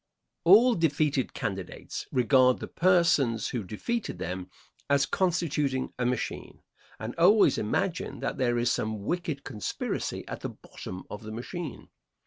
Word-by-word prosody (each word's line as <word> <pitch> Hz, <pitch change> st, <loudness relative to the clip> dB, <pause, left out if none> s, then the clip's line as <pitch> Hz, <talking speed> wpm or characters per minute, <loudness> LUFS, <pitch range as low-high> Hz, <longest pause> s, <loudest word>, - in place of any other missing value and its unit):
All 225 Hz, +8 st, +7 dB
defeated 150 Hz, -, +1 dB
candidates 95 Hz, -3 st, -5 dB
regard 125 Hz, 0 st, +4 dB
the -, -, -6 dB
persons 165 Hz, -10 st, +3 dB
who 120 Hz, -4 st, -3 dB
defeated 215 Hz, -, -3 dB
them 95 Hz, 0 st, -5 dB, 0.4 s
as 140 Hz, 0 st, +4 dB
constituting 150 Hz, -7 st, 0 dB
a 125 Hz, -, +1 dB
machine, 125 Hz, 0 st, -4 dB, 0.4 s
and 110 Hz, +2 st, -5 dB
always 195 Hz, +5 st, +5 dB
imagine 105 Hz, -, -1 dB
that -, -, -3 dB
there 120 Hz, -2 st, +2 dB
is 120 Hz, 0 st, +2 dB
some 110 Hz, -2 st, -2 dB
wicked 160 Hz, -, -2 dB
conspiracy 110 Hz, -6 st, -4 dB
at -, -, -5 dB
the -, -, -4 dB
bottom 90 Hz, 0 st, -9 dB
of 105 Hz, -, -6 dB
the 110 Hz, 0 st, -8 dB
machine. 145 Hz, +7 st, -6 dB
130 Hz, 135 wpm, -28 LUFS, 110-170 Hz, 0.4 s, All